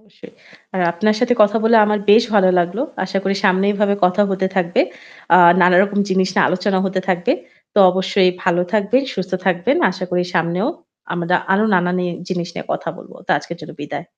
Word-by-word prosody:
অবশ্যই। 215 -1 -18 0.4
আর 185 - -1
আপনার 215 +5 0
সাথে 245 0 +2
কথা 210 +2 +2
বলে 230 +1 +4
আমার 210 0 0
বেশ 225 +3 +6
ভালো 190 -2 +4
লাগলো। 175 +9 -1 0.2
আশা 190 +1 -3
করি 195 +1 0
সামনে 190 0 +3
এইভাবে 200 -1 0
কথা 180 +3 +2
হতে 190 0 -1
থাকবে। 175 -1 +1 0.5
আ - - +8 0.2
নানা 175 0 +4
রকম 205 0 -2
জিনিস 190 0 +1
নিয়ে - - +3
আলোচনা 185 +1 -1
হতে 185 0 -2
থাকবে। 185 +8 0 0.4
তো - - +1
অবশ্যই 190 0 +1
ভালো 180 -1 +1
থাকবেন, 215 +5 +1
সুস্থ 190 -1 -5
থাকবেন। 190 - +1
আশা 185 0 -6
করি 180 0 0
সামনেও 170 - 0 0.4
আমরা 175 0 0 0.2
আরও 210 +3 +2
নানান 180 0 0 0.2
জিনিস 175 -2 -4
নিয়ে - - -7
কথা - - -5
বলব। - - -14
তা - - -5
আজকের - - -9
জন্য - - -10
বিদায়। - - -7
190 Hz, 190 wpm, -18 LUFS, 180-205 Hz, 0.5 s, আ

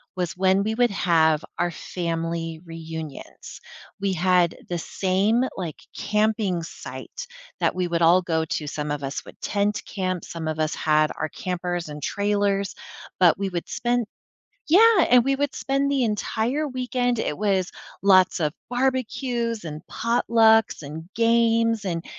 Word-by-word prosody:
was 180 -2 -3
when 190 +1 +3
we 220 +2 -1
would 245 -1 +3
have 160 -5 +3 0.2
our 175 - +1
family 165 -1 -4
reunions, 160 -3 -8 0.4
we 195 -1 0
had 180 -1 +2
the 175 - -1
same, 195 +7 +1
like, 170 -5 -4 0.2
camping 210 -4 0
site 160 - -8 0.3
that - - +1
we 180 -1 0
would 170 0 0
all 170 +2 +6
go 160 -2 -1
to- 155 -1 -3
some 150 +1 -4
of 145 -1 -3
us 135 +1 -4
would - - -14
tent 205 0 0
camp, 185 -3 -3
some 165 -1 -6
of 155 0 -3
us 155 0 0
had 155 0 +2
our 155 - -1
campers 175 -1 -3
and 150 0 -7
trailers, 200 0 0 0.5
but 175 -3 +5
we 195 0 -2
would 175 -2 -4
spend 240 -1 0 0.6
Yeah, 415 +2 +6
and 245 0 +7
we 275 +2 +1
would 285 0 -1
spend 275 +1 0
the 275 -2 +2
entire 230 +6 -1
weekend 250 -2 -1
it 150 - -2
was 195 -3 +1 0.3
lots 190 -1 +5
of 150 -2 +1 0.2
barbecues 245 -3 -1
and 155 -2 -6
potlucks 225 -4 +3
and 155 +3 -8
games, 230 -1 +2
and 170 -3 -3
190 Hz, 155 wpm, -24 LUFS, 165-230 Hz, 0.6 s, and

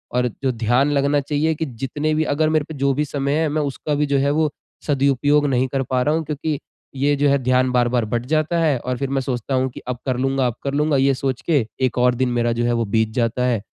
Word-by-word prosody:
और 125 0 +2 0.2
जो 130 - +2
ध्यान 120 +5 +1
लगना 140 +1 +2
चाहिए 150 +3 0
कि 160 - -2
जितने 135 +5 -3
भी 155 - +2
अगर 155 +2 +1
मेरे 155 -2 +1
पे 160 - -5
जो 140 0 +2
भी 150 +3 0
समय 140 -1 -2
है 160 - +2
मैं 155 +1 0
उसका 145 +2 -3
भी 150 - +1
जो 140 -1 +1
है 140 +1 +2
वो 155 0 +2 0.4
सदुपयोग 145 +1 +2
नहीं 130 -1 +1
कर 135 +1 -2
पा 130 -1 -1
रहा 150 +3 +1
हूँ 165 - -1
क्योंकि 150 0 -3 0.4
ये 145 +2 +2
जो 145 0 +3
है 140 - +4
ध्यान 130 0 +2
बार-बार 120 -1 +2
बँट 120 +2 -2
जाता 155 +2 +1
है 150 -5 +2
और 125 +1 -3
फिर 135 +1 -3
मैं 135 -1 0
सोचता 130 0 -3
हूँ 130 0 +1
कि - - -9
अब 125 - -2
कर 130 -2 0
लूँगा 135 0 +1
अब 120 - -3
कर 140 0 -2
लूँगा 150 0 +2
ये 135 +1 +3
सोच 130 -1 -2
के 140 -8 +3 0.2
एक 125 - -2
और 125 0 +3
दिन 130 0 0
मेरा 120 -1 +1
जो 120 - +1
है 120 - +1
वो - - 0
बीत 110 +1 +1
जाता 120 +1 0
है, 120 -5 0
135 Hz, 265 wpm, -21 LUFS, 125-145 Hz, 0.4 s, है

